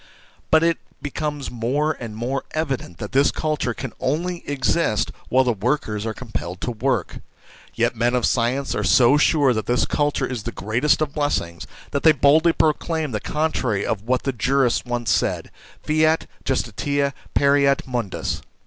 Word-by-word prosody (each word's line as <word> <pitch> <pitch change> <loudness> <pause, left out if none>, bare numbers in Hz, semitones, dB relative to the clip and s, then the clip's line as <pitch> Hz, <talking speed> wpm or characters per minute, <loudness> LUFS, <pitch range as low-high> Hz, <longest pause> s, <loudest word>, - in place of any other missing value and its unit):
But 160 0 +5
it 165 0 +2 0.2
becomes 145 -1 -4
more 130 +6 0
and 115 -3 -7
more 125 +5 -2
evident 135 - -3
that 105 - -6
this 140 +2 +4
culture 150 -6 -2
can 130 - -6
only 170 +6 -1
exist 135 -4 +1 0.2
while 130 +1 +4
the 125 -2 +1
workers 110 -1 -1
are 110 - -2
compelled 90 - -6
to 125 - -2
work. 120 -4 -1 0.6
Yet 120 +1 +1
men 120 +2 +1
of 125 - +1
science 130 +3 0
are - - -1
so 130 +3 +5
sure 145 -3 +3
that 110 -1 -3
this 120 0 +2
culture 145 -1 0
is 125 -4 -4
the 120 - -5
greatest 120 +10 +1
of 145 -2 -4
blessings, 115 - -2 0.2
that 140 - -1
they 160 - +6
boldly 155 +5 +4
proclaim 160 -1 0
the 105 - -2
contrary 130 -10 -1
of 105 - -1
what 125 +3 0
the 135 - -1
jurists 125 +2 +1
once 120 -3 -1
said: - - 0 0.3
fiat 155 +1 +2 0.2
justitia, 140 +3 -1 0.2
pereat 140 -1 +3
mundus. 120 -6 -3
130 Hz, 165 wpm, -22 LUFS, 115-150 Hz, 0.6 s, they